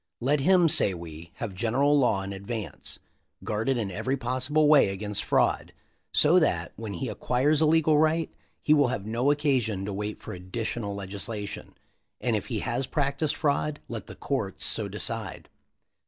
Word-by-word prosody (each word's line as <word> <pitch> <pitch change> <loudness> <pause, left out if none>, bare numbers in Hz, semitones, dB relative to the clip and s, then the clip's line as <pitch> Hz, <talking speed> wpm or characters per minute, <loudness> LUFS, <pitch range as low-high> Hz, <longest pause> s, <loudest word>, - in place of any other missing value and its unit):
"Let 140 +4 +2
him, 180 +3 +5
say 100 - +3
we, 85 -1 -9
have 110 -5 -5
general 130 +9 +2
law 120 -8 +2
in 100 +1 -5
advance 100 +2 -6 0.5
(guarded 115 +5 0
in 105 -4 -2
every 130 +9 -1
possible 130 +5 +1
way 145 -8 +6
against 100 +1 -3
fraud), - - +1 0.4
so 165 +5 +5
that, 85 - 0
when 110 -2 -6
he 85 - -3
acquires 145 +5 +1
a 155 - +5
legal 155 -1 +4
right, 160 +1 +1 0.3
he 150 - +5
will 145 -3 +4
have 110 -5 -3
no 120 +5 0
occasion 130 -9 +1
to 100 - -4
wait 105 +2 -4
for - - -6
additional 100 +3 -4
legislation; 100 +2 -6 0.4
and - - 0
if - - -3
he - - -2
has 125 +2 -2
practiced 145 +1 0
fraud 145 0 0
let 110 -4 -6
the - - -9
courts 110 -9 -3
so 110 - 0
decide." 105 -1 -5
120 Hz, 170 wpm, -27 LUFS, 100-145 Hz, 0.5 s, way